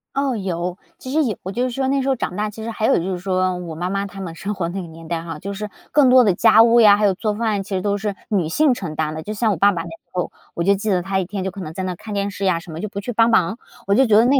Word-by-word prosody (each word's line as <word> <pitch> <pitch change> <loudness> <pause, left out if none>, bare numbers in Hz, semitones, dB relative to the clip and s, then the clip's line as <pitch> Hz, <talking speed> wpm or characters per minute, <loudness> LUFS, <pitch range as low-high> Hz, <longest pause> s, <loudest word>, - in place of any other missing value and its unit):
哦， 275 -2 0
有。 180 -3 -3 0.2
其 260 - -8
实 310 +2 +3
有 220 -8 -2
我 190 - -4
就 240 +5 -1
是 255 - 0
说 265 +2 -1
那 275 +1 +1
时 270 - -1
候 265 - +3
长 185 - -4
大， 210 +1 -1
其 220 +1 -9
实 230 - -4
还 220 0 -2
有 - - +4
就 180 +3 -2
是 180 - -3
说 185 0 0
我 170 -3 -6
妈 175 +3 -3
妈 195 +1 -1
她 195 0 -11
们 175 -3 -5
生 200 +5 -4
活 180 -3 -2
那 190 +2 -4
个 175 - -8
年 165 0 -12
代 165 0 -2
哈， 165 -2 -6
就 200 +5 -5
是 210 +1 -5 0.2
更 285 -4 +5
多 255 0 +7
的 205 -5 +3
家 225 +3 +6
务 235 +1 +5
呀， 205 -2 +7
还 210 - +2
有 200 - +4
做 210 +3 -2
饭 220 -1 0
呀， - - -2
其 195 - -15
实 185 - -1
都 205 0 0
是 205 0 -3
女 190 -8 +1
性 295 - +3
承 180 -10 -5
担 155 0 -1
的。 160 - -5
就 210 +6 -5
像 215 +1 +1
我 195 - -1
爸 200 +5 +5
爸 170 -4 -3
那 170 - -8
时 165 - -9 0.2
候， 180 -1 -2 0.2
我 170 - -1
就 200 +3 +4
记 205 +2 -2
得 185 -3 +2
他 190 +1 0
一 190 - -1
天 195 +1 -4
就 190 - -2
可 195 +1 -8
能 155 - -6
在 190 - -4
那 185 -1 -2
看 210 +4 -8
电 200 0 -1
视 200 0 -4
呀 180 -3 +2
什 170 0 -11
么， 160 - -6
就 215 +4 -4
不 200 0 -5
去 210 +5 -4
帮 230 +1 +4
忙。 220 0 +2 0.3
我 200 - +2
就 265 +6 +5
觉 210 -2 +5
得 225 - +6
那 270 +2 +4
200 Hz, 380 characters per minute, -21 LUFS, 180-220 Hz, 0.3 s, 多